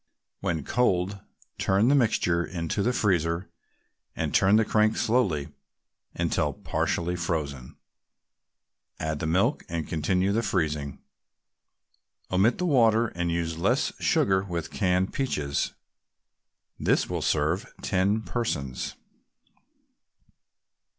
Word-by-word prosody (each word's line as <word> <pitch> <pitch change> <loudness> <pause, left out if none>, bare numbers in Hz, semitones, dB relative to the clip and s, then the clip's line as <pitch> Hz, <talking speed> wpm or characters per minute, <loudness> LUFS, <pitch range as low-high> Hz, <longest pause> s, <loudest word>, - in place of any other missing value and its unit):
When 80 -4 -2
cold, 100 - +1 0.4
turn 100 +4 +3
the 140 - +5
mixture 105 -10 +2
into 85 +2 -3
the 120 - +2
freezer 90 -6 0 0.6
and - - -2
turn 100 +2 +5
the 110 0 +4
crank 110 +1 +2
slowly 95 - +1 0.7
until - - 0
partly 85 +1 -1
frozen; 75 -7 -3 1.2
add 80 -1 -2
the 80 - -2
milk, 95 - +1
and 85 -2 -3
continue 90 +4 +1
the 110 +3 +1
freezing. 75 - -2 1.3
Omit 95 +6 +3
the 180 - -1
water 115 -7 +4
and 85 0 -2
use 85 -1 -2
less - - +1
sugar 95 -1 +2
with 85 -4 -4
canned 90 -2 +1
peaches. 75 - -1 1.0
This - - +2
will - - -3
serve - - 0
ten 100 +4 +1
persons. 70 - -3
90 Hz, 110 wpm, -27 LUFS, 80-110 Hz, 1.3 s, the